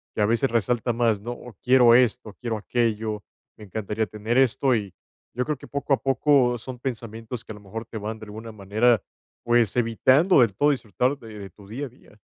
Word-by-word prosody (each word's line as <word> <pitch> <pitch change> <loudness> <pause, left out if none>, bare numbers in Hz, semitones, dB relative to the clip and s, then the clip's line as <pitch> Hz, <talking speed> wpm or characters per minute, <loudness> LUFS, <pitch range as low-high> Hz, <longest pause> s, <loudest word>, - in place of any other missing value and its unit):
que 105 - 0
a - - +4
veces 115 +5 +1
resalta 120 +1 +1
más, 115 -3 +1
¿no? 120 - -5
O 120 -2 -12
quiero 125 -2 +6
esto, 125 -2 +2
o - - -21
quiero 115 +1 -4
aquello, 110 -2 -1 0.3
me 110 - -12
encantaría 105 +2 -2
tener 110 +3 -2
esto, 130 0 +3
y 100 -4 -3 0.4
yo 125 - -1
creo 150 - -1
que, - - -13
poco 140 0 -1
a 135 - +4
poco, 135 -2 +3
son 125 +2 -9
pensamientos 115 -1 -6
que, - - -9
a - - -11
lo 105 - -14
mejor, 110 +3 -7
te 110 - -8
van, 110 +2 -5
de 110 - -9
alguna 110 +2 -9
manera, 110 +3 +2 0.4
pues, 120 -3 +2
evitando 130 - +4
del 110 -5 +2
todo 145 +7 +3
disfrutar 125 +1 -1
de 110 -3 -11
de 100 -1 -8
tu 100 +1 -17
día 130 +8 -5
a - - -8
día. 115 -3 -22
115 Hz, 220 wpm, -24 LUFS, 110-125 Hz, 0.4 s, quiero